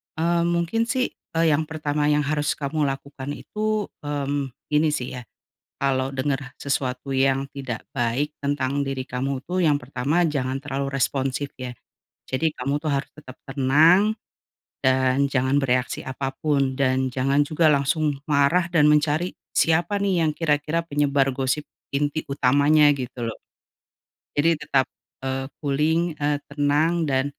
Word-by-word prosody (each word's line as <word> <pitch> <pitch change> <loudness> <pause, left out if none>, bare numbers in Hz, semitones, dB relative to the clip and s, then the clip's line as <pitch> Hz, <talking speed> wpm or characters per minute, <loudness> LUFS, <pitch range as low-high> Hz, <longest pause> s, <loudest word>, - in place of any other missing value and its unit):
Eee, 170 +1 +1
mungkin 175 +7 0
sih, 255 0 0 0.2
eee, 165 0 +3
yang 150 +1 +1
pertama 150 -2 -1
yang 150 0 +3
harus 150 0 0
kamu 150 +2 -2
lakukan 135 0 -5
itu, 215 0 -2 0.2
mmm, 140 -2 -2 0.2
ini 155 +1 +4
sih 125 -1 -3
ya, 125 - -6 0.6
kalo 135 0 0
denger 135 -1 -2
sesuatu 135 -1 -2
yang 135 +1 +2
tidak 130 -5 -5
baik 130 +4 0
tentang 140 -1 0
diri 135 -1 -3
kamu 130 +1 -3
tuh 180 +6 -4
yang 145 -3 +3
pertama 140 +6 0
jangan 135 -2 -2
terlalu 140 0 -3
responsif 135 +1 -1
ya. 125 -1 -5 0.5
Jadi 145 +5 0
kamu 140 +3 -1
tuh 155 - -3
harus 140 -1 -1
tetep 135 -4 -12
tenang, 155 +10 +4 0.7
dan 130 +1 +2
jangan 135 +1 +2
bereaksi 125 -1 0
apapun 135 +1 -1
dan 130 -1 +1
jangan 135 +3 +2
juga 155 +2 +3
langsung 145 +1 +1
marah 150 +4 +3
dan 150 -3 +5
mencari, 150 +3 +2 0.2
siapa 175 +5 +2
nih 185 -5 +2
yang 155 - +2
kira-kira 155 +1 0
penyebar 145 -3 +1
gosip 135 +3 -1 0.3
inti 145 +2 -1
utamanya, 145 +3 +4
gitu 125 -2 -4
loh. - - -7 1.0
Jadi 165 +3 +4
tetap, 135 -3 +1 0.4
eee, 135 0 -2
cooling, 155 +4 +1
eee 145 -1 0
tenang, 150 +4 +1
dan, 130 0 +2
140 Hz, 140 wpm, -24 LUFS, 135-155 Hz, 1.0 s, dan